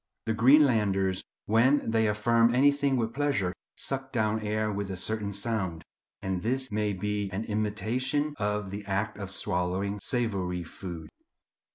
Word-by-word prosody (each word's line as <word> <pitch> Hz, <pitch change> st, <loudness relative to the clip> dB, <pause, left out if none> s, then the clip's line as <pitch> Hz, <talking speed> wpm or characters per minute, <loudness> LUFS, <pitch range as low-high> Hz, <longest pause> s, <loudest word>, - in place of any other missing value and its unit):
The 110 Hz, -, +1 dB
Greenlanders, 110 Hz, -7 st, +4 dB, 0.2 s
"when 115 Hz, +4 st, +3 dB
they 110 Hz, -1 st, +3 dB
affirm 115 Hz, +3 st, +3 dB
anything 140 Hz, 0 st, +3 dB
with 115 Hz, -1 st, -1 dB
pleasure, 135 Hz, -11 st, 0 dB, 0.2 s
suck 135 Hz, 0 st, -2 dB
down 110 Hz, -2 st, +1 dB
air 110 Hz, 0 st, -1 dB
with 100 Hz, -1 st, -3 dB
a 95 Hz, -, -4 dB
certain 105 Hz, +2 st, -3 dB
sound;" 100 Hz, -6 st, -2 dB, 0.4 s
and 95 Hz, -1 st, -1 dB
this 130 Hz, +4 st, -1 dB
may 105 Hz, 0 st, 0 dB
be 105 Hz, +1 st, -2 dB
an 95 Hz, +3 st, -3 dB
imitation 110 Hz, +8 st, -1 dB
of 105 Hz, -2 st, -1 dB
the 100 Hz, +1 st, -5 dB
act 105 Hz, +2 st, -2 dB
of 100 Hz, -2 st, -4 dB
swallowing 95 Hz, +3 st, -1 dB
savoury 100 Hz, -7 st, -1 dB
food. 85 Hz, -1 st, -8 dB
105 Hz, 145 wpm, -28 LUFS, 95-120 Hz, 0.4 s, Greenlanders